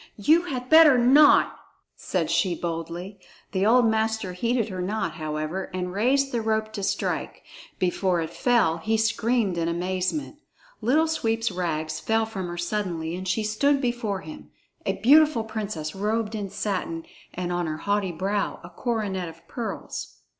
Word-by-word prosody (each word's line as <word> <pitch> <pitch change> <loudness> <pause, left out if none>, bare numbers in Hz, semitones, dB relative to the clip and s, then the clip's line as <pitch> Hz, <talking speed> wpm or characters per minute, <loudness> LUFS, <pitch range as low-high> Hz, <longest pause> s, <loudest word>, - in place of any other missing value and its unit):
"You 315 - +4
had 255 -6 -4
better 315 -2 +8
not," 270 +5 +5 0.4
said - - -2
she 180 -3 +2
boldly. 170 +4 -5 0.3
The 190 +1 +1
old 245 +2 +5
master 220 -3 0
heeded 230 +4 0
her 185 -2 -4
not, 190 -2 -1
however, 155 +4 -4
and 180 -1 -3
raised 270 +7 +2
the 235 - -1
rope 220 0 -1
to 205 - -4
strike. 195 - -2 0.3
Before 185 0 +1
it 160 -1 -3
fell, 225 -10 +2
he 220 +7 0
screamed 220 -3 +1
in 165 - 0
amazement! 185 - -2 0.4
Little 305 +7 +3
Sweep's 225 -8 0
rags 160 -3 -2
fell 225 0 +1
from 195 -5 -5
her 175 0 -6
suddenly, 175 -3 -2
and 185 +1 -6
she 200 +4 0
stood 275 +7 +2
before 240 -6 -2
him, 305 -1 -10 0.4
a - - +2
beautiful 295 -1 +5
princess 210 -8 -4
robed 215 +2 -1
in 205 -3 -4
satin, 185 -5 -3 0.3
and 180 0 -3
on 175 -1 -1
her 155 0 -3
haughty 200 +1 0
brow 195 +4 -2
a 170 - -11
coronet 195 -4 -2
of 165 0 -16
pearls. 235 -3 -5
205 Hz, 160 wpm, -25 LUFS, 180-230 Hz, 0.4 s, better